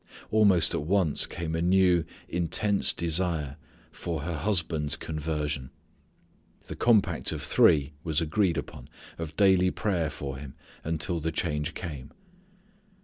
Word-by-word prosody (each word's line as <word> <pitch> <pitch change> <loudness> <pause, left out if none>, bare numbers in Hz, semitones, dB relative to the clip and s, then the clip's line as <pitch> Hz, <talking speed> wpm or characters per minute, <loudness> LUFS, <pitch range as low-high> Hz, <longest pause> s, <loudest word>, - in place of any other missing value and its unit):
Almost 100 -5 +4
at - - -1
once 85 -1 +2
came 85 -2 -5
a 80 - -1
new 90 -1 +3 0.2
intense 95 +4 +2
desire 80 -4 -1 0.3
for 85 -3 -4
her 85 +3 -4
husband's 80 -4 0
conversion. 75 -4 -3 1.0
The - - -7
compact 115 -5 +2
of - - -5
three 75 -1 +3
was 80 -2 0
agreed 85 +2 +1
upon, 60 - -7 0.3
of 80 -1 -6
daily 95 -2 +4
prayer 90 -6 -1
for 70 -1 -6
him 70 0 -10 0.3
until 80 +1 -1
the 80 +1 -2
change 75 -1 -2
came. 75 -6 -7
80 Hz, 130 wpm, -27 LUFS, 75-90 Hz, 1.0 s, Almost